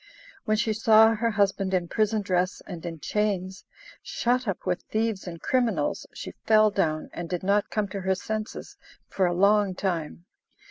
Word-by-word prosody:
When 215 Hz, 0 st, +1 dB
she 220 Hz, 0 st, +1 dB
saw 220 Hz, +1 st, +6 dB
her 230 Hz, +1 st, 0 dB
husband 195 Hz, -2 st, +1 dB
in 175 Hz, -2 st, 0 dB
prison 215 Hz, +2 st, 0 dB
dress 185 Hz, -1 st, 0 dB
and 175 Hz, -4 st, -8 dB
in 165 Hz, -2 st, -7 dB
chains, 195 Hz, -1 st, -2 dB, 0.4 s
shut 250 Hz, +1 st, -1 dB
up 195 Hz, -, -3 dB
with 180 Hz, -, -1 dB
thieves 220 Hz, -3 st, -1 dB
and 170 Hz, -1 st, -7 dB
criminals, 250 Hz, +1 st, 0 dB
she -, -, -8 dB
fell 215 Hz, -1 st, +5 dB
down, 155 Hz, -6 st, -1 dB
and 175 Hz, -1 st, -6 dB
did 180 Hz, -1 st, -3 dB
not 200 Hz, +2 st, +1 dB
come 210 Hz, -2 st, -1 dB
to 195 Hz, 0 st, -5 dB
her 190 Hz, 0 st, +1 dB
senses 215 Hz, +2 st, -5 dB, 0.3 s
for 190 Hz, -2 st, +1 dB
a 175 Hz, -, -1 dB
long 200 Hz, 0 st, +3 dB
time. 170 Hz, -3 st, -3 dB
200 Hz, 175 wpm, -26 LUFS, 185-215 Hz, 0.4 s, saw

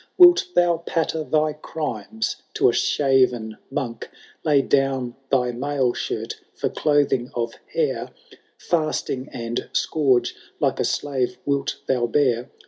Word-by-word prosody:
Wilt 360 Hz, +1 st, +8 dB
thou 175 Hz, -1 st, +4 dB
patter 160 Hz, -1 st, -1 dB
thy 155 Hz, 0 st, +1 dB
crimes 115 Hz, -8 st, -4 dB, 0.2 s
to -, -, +4 dB
a -, -, 0 dB
shaven 125 Hz, -6 st, +2 dB
monk,—. 120 Hz, -4 st, -4 dB, 0.3 s
Lay 145 Hz, -3 st, +4 dB
down 135 Hz, -3 st, +1 dB
thy 125 Hz, -2 st, +2 dB
mail 130 Hz, 0 st, 0 dB
shirt -, -, -4 dB
for -, -, -1 dB
clothing 145 Hz, -5 st, +1 dB
of 115 Hz, -1 st, -2 dB, 0.2 s
hair, 475 Hz, -2 st, -1 dB, 0.3 s
— -, -, -39 dB
Fasting 155 Hz, -5 st, 0 dB
and 115 Hz, 0 st, -4 dB
scourge, 135 Hz, -6 st, +2 dB, 0.2 s
like -, -, +1 dB
a -, -, +2 dB
slave, 135 Hz, -4 st, -1 dB
wilt 140 Hz, -1 st, -1 dB
thou 125 Hz, -2 st, +1 dB
bear 125 Hz, -1 st, +1 dB
135 Hz, 135 wpm, -23 LUFS, 120-150 Hz, 0.3 s, Wilt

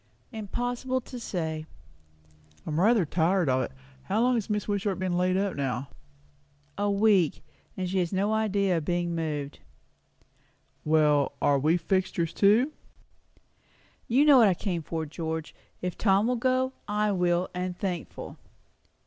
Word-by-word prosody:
"Impossible 245 Hz, +4 st, -2 dB
to 250 Hz, 0 st, -9 dB
say." 160 Hz, -7 st, -4 dB, 1.0 s
"I'm 155 Hz, +1 st, -2 dB
rather 215 Hz, 0 st, +4 dB
tired 170 Hz, +3 st, +1 dB
of 130 Hz, 0 st, +2 dB
it. -, -, -3 dB, 0.3 s
How 200 Hz, +3 st, 0 dB
long 250 Hz, +1 st, +3 dB
has 230 Hz, -4 st, -1 dB
Mrs. 210 Hz, -2 st, -2 dB
Wishart 200 Hz, -2 st, -1 dB
been 185 Hz, -1 st, -1 dB
laid 185 Hz, +1 st, +2 dB
up 195 Hz, -1 st, -1 dB
now?" 135 Hz, -1 st, -3 dB, 0.9 s
"A 205 Hz, 0 st, 0 dB
week; 200 Hz, -5 st, +2 dB, 0.3 s
and 185 Hz, -1 st, -2 dB
she 190 Hz, +1 st, 0 dB
has 175 Hz, -2 st, -1 dB
no 200 Hz, +2 st, +1 dB
idea 200 Hz, -4 st, +1 dB
of 160 Hz, -, -2 dB
being 175 Hz, 0 st, -1 dB
moved." 150 Hz, -4 st, -3 dB, 1.2 s
"Well, 150 Hz, -2 st, +3 dB
are 140 Hz, -1 st, +3 dB
we 155 Hz, +5 st, +3 dB
fixtures 175 Hz, -2 st, -1 dB
too?" 220 Hz, +8 st, +4 dB, 1.4 s
"You 265 Hz, +6 st, +4 dB
know 285 Hz, -4 st, +7 dB
what 225 Hz, -, +7 dB
I 190 Hz, -, +3 dB
came 175 Hz, -3 st, -3 dB
for, 160 Hz, +1 st, -4 dB
George. 160 Hz, +1 st, -5 dB, 0.3 s
If 180 Hz, -1 st, -3 dB
Tom 200 Hz, 0 st, +3 dB
will 250 Hz, +1 st, +1 dB
go, 255 Hz, +2 st, +1 dB
I 210 Hz, 0 st, +1 dB
will, 180 Hz, -1 st, +1 dB
and 180 Hz, 0 st, -3 dB
thankful." 180 Hz, -4 st, -5 dB
185 Hz, 150 wpm, -27 LUFS, 165-210 Hz, 1.4 s, know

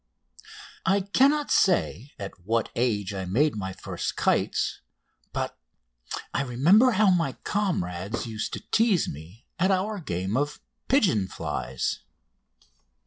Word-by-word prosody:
I 195 Hz, +1 st, +3 dB
cannot 275 Hz, +9 st, +3 dB
say 145 Hz, -, +2 dB
at 100 Hz, -1 st, -5 dB
what 115 Hz, +3 st, 0 dB
age 105 Hz, -5 st, 0 dB
I 95 Hz, -1 st, -3 dB
made 135 Hz, +11 st, +2 dB
my 95 Hz, -2 st, -3 dB
first 95 Hz, -, -4 dB
kites, -, -, +1 dB, 0.5 s
but -, -, -3 dB, 0.8 s
I -, -, +1 dB
remember 170 Hz, -, +4 dB
how 205 Hz, -1 st, +5 dB
my 165 Hz, -7 st, +1 dB
comrades 100 Hz, -, -1 dB
used 110 Hz, -2 st, -4 dB
to -, -, -5 dB
tease 220 Hz, -6 st, +3 dB
me 85 Hz, -, -9 dB
at 185 Hz, +3 st, +3 dB
our 200 Hz, +2 st, 0 dB
game 95 Hz, -, -3 dB
of 145 Hz, +2 st, -1 dB, 0.3 s
"Pigeon 185 Hz, -, +3 dB
flies!" 65 Hz, -7 st, -3 dB
135 Hz, 125 wpm, -26 LUFS, -, 0.8 s, how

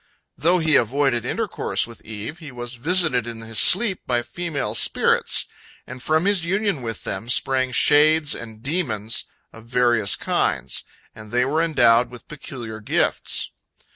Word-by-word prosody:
" -, -, -52 dB
Though 170 Hz, +5 st, +2 dB
he 160 Hz, -4 st, +3 dB
avoided 130 Hz, 0 st, 0 dB
intercourse -, -, -1 dB
with 115 Hz, -1 st, -12 dB
Eve, 110 Hz, +9 st, -8 dB
he 155 Hz, -4 st, -10 dB
was 120 Hz, 0 st, -6 dB
visited 140 Hz, -3 st, +1 dB
in 115 Hz, -1 st, -7 dB
his 115 Hz, -1 st, 0 dB
sleep 200 Hz, -1 st, +5 dB
by 120 Hz, -1 st, +1 dB
female 170 Hz, 0 st, -4 dB
spirits, -, -, +2 dB, 0.4 s
and 130 Hz, 0 st, -10 dB
from 160 Hz, +5 st, +1 dB
his 200 Hz, -3 st, +2 dB
union 195 Hz, -3 st, -1 dB
with 115 Hz, -3 st, -6 dB
them 100 Hz, +5 st, -5 dB
sprang 130 Hz, 0 st, 0 dB
shades 150 Hz, +3 st, +3 dB
and 110 Hz, -1 st, -9 dB
demons 125 Hz, -, -1 dB, 0.3 s
of 115 Hz, 0 st, -14 dB
various 120 Hz, -4 st, +3 dB
kinds, -, -, -2 dB, 0.3 s
and 110 Hz, -1 st, -13 dB
they 125 Hz, +1 st, +1 dB
were 155 Hz, +4 st, 0 dB
endowed 120 Hz, -7 st, +3 dB
with 125 Hz, -1 st, -13 dB
peculiar 120 Hz, -7 st, -8 dB
gifts. 110 Hz, -, 0 dB
125 Hz, 155 wpm, -22 LUFS, 115-160 Hz, 0.4 s, sleep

